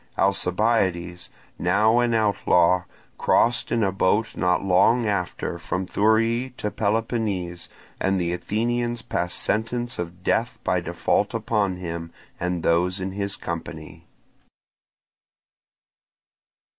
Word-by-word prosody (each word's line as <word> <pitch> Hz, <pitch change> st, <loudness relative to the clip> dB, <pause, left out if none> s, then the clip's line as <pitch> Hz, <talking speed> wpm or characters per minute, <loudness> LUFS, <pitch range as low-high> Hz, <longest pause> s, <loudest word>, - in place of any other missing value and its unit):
Alcibiades, 95 Hz, -2 st, +1 dB, 0.3 s
now 110 Hz, +2 st, +3 dB
an 120 Hz, -1 st, +2 dB
outlaw, 90 Hz, -4 st, +3 dB, 0.3 s
crossed 120 Hz, +1 st, +2 dB
in 115 Hz, -2 st, +2 dB
a 95 Hz, -, +2 dB
boat 100 Hz, +4 st, +1 dB
not 90 Hz, +1 st, +1 dB
long 105 Hz, +6 st, +4 dB
after 100 Hz, -4 st, -2 dB
from 95 Hz, +1 st, -3 dB
Thurii 115 Hz, +6 st, +1 dB
to 105 Hz, -, -3 dB
Peloponnese; 105 Hz, -5 st, -1 dB, 0.3 s
and 95 Hz, 0 st, +1 dB
the 85 Hz, -1 st, -1 dB
Athenians 120 Hz, +6 st, -1 dB
passed 90 Hz, 0 st, -2 dB
sentence 120 Hz, +3 st, -1 dB
of 90 Hz, +1 st, -6 dB
death -, -, 0 dB
by -, -, +1 dB
default -, -, 0 dB
upon 100 Hz, -5 st, 0 dB
him 85 Hz, -2 st, -5 dB, 0.3 s
and 90 Hz, -1 st, -2 dB
those 90 Hz, +3 st, +2 dB
in 95 Hz, 0 st, -3 dB
his 100 Hz, 0 st, -3 dB
company. 85 Hz, -2 st, -7 dB
100 Hz, 110 wpm, -24 LUFS, 90-115 Hz, 0.3 s, long